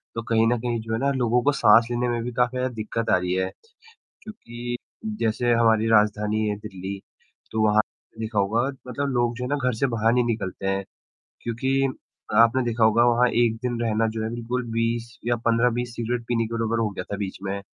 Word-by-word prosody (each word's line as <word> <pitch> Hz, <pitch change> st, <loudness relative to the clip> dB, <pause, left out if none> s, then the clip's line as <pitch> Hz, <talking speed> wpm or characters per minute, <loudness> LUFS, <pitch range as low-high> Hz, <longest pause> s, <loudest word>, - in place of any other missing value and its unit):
तो 115 Hz, -, -2 dB
कहीं 115 Hz, -1 st, +2 dB
न 120 Hz, +1 st, +2 dB
कहीं 120 Hz, 0 st, -2 dB
जो 110 Hz, 0 st, -5 dB
है 110 Hz, -, 0 dB
ना 140 Hz, +1 st, +1 dB
लोगों 125 Hz, -1 st, +2 dB
को 145 Hz, -, +4 dB
साँस 115 Hz, -4 st, +5 dB
लेने 120 Hz, +1 st, 0 dB
में 120 Hz, -1 st, -1 dB
भी 125 Hz, -, -4 dB
काफ़ी 125 Hz, +1 st, 0 dB
ज़्यादा 125 Hz, 0 st, -1 dB
दिक़्क़त 115 Hz, +1 st, -3 dB
आ -, -, +5 dB
रही 90 Hz, 0 st, -2 dB
है। 95 Hz, 0 st, 0 dB, 0.7 s
क्योंकि 120 Hz, -, -7 dB, 0.4 s
जैसे 115 Hz, +2 st, +1 dB
हमारी 115 Hz, -1 st, +3 dB
राजधानी 105 Hz, 0 st, +2 dB
है 105 Hz, -, -1 dB
दिल्ली 100 Hz, -2 st, -7 dB, 0.5 s
तो 110 Hz, 0 st, +1 dB
वहाँ 105 Hz, 0 st, +4 dB, 0.4 s
देखा 110 Hz, -1 st, -2 dB
होगा 105 Hz, +4 st, +2 dB, 0.3 s
मतलब 140 Hz, +3 st, -2 dB
लोग 120 Hz, -1 st, +1 dB
जो 125 Hz, -, -4 dB
है -, -, -3 dB
ना 145 Hz, -, 0 dB
घर -, -, +1 dB
से 125 Hz, +5 st, +1 dB
बाहर 115 Hz, -2 st, +1 dB
नहीं 125 Hz, 0 st, +3 dB
निकलते 100 Hz, -4 st, -3 dB
हैं, 95 Hz, 0 st, 0 dB, 0.6 s
क्योंकि 130 Hz, +4 st, 0 dB, 0.5 s
आपने 115 Hz, +3 st, +5 dB
देखा 115 Hz, -1 st, +1 dB
होगा 110 Hz, +2 st, +5 dB
वहाँ 120 Hz, +1 st, +4 dB
1 120 Hz, -1 st, +2 dB
दिन 120 Hz, -1 st, -2 dB
रहना 115 Hz, -1 st, +1 dB
जो 110 Hz, -, -2 dB
है 110 Hz, -, -1 dB
बिल्कुल 120 Hz, +2 st, -3 dB
20 115 Hz, +1 st, -1 dB
या 120 Hz, 0 st, +2 dB
15-20 120 Hz, +1 st, +1 dB
सिगरेट 120 Hz, +1 st, -2 dB
पीने 115 Hz, -2 st, +1 dB
के 115 Hz, -, -6 dB
बराबर 115 Hz, 0 st, 0 dB
हो 115 Hz, -1 st, +1 dB
गया 100 Hz, -, -6 dB
था 100 Hz, -, -2 dB
बीच 100 Hz, -2 st, -4 dB
में, 100 Hz, 0 st, -3 dB
115 Hz, 215 wpm, -24 LUFS, 110-120 Hz, 0.7 s, साँस